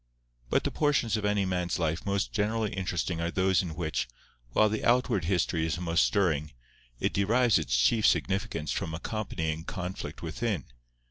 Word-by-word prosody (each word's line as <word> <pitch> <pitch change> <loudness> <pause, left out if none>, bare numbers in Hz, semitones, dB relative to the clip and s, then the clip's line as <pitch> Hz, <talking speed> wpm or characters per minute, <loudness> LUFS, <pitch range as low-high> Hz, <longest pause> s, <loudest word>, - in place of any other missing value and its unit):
But - - +2
the - - -1
portions 145 -7 +1
of 105 -1 -2
any 105 -1 +2
man's 90 -2 -1
life 80 +2 -1
most 100 +1 0
generally 110 0 0
interesting 90 -2 -2
are 85 - 0
those 95 0 +2
in 85 -4 -5
which, 80 -6 -2 0.4
while 110 - +4
the 110 0 -2
outward 120 -7 +2
history 85 -2 +1
is 80 +1 -1
most 85 -1 +2
stirring, 75 -7 +1 0.5
it - - 0
derives 115 +1 +3
its - - 0
chief 105 - +4
significance 95 -6 0
from 80 - -2
accompanying 80 -5 -3
conflict 90 -1 -5
within. 85 - -2
95 Hz, 160 wpm, -29 LUFS, 80-105 Hz, 0.5 s, while